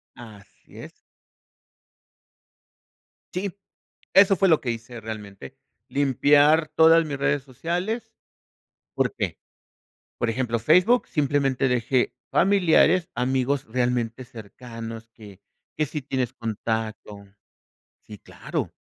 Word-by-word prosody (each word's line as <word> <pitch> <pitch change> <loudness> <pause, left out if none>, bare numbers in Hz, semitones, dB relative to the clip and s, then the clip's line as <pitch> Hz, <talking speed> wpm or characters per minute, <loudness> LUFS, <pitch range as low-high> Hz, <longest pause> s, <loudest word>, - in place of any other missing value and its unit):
Así 110 -5 -15
es. - - -12 2.3
Sí, 185 0 -3 0.6
eso 195 0 +6
fue 195 +1 +2
lo 160 - +4
que 125 - -4
hice 115 0 -8
realmente, 105 -8 -9 0.3
limpiar 145 +3 +3
todas 165 +1 +6
mis 145 -2 -4
redes 140 +1 0
sociales, 175 - -4 0.8
¿por - - 0
qué? - - -3 0.8
Por 120 - -1
ejemplo, 115 0 -1
Facebook, 180 - +3
simplemente 140 -3 0
dejé 125 +1 0 0.2
familiares, 180 -2 +3
amigos 130 +2 0
realmente 125 0 -2
cercanos, 115 0 -10
que 100 -4 -14 0.4
que 155 - 0
sí 150 0 -6
tienes 130 -2 -3
contacto 110 -2 -5 0.8
sí, 105 - -11
claro. - - -5
130 Hz, 100 wpm, -24 LUFS, 115-155 Hz, 2.3 s, eso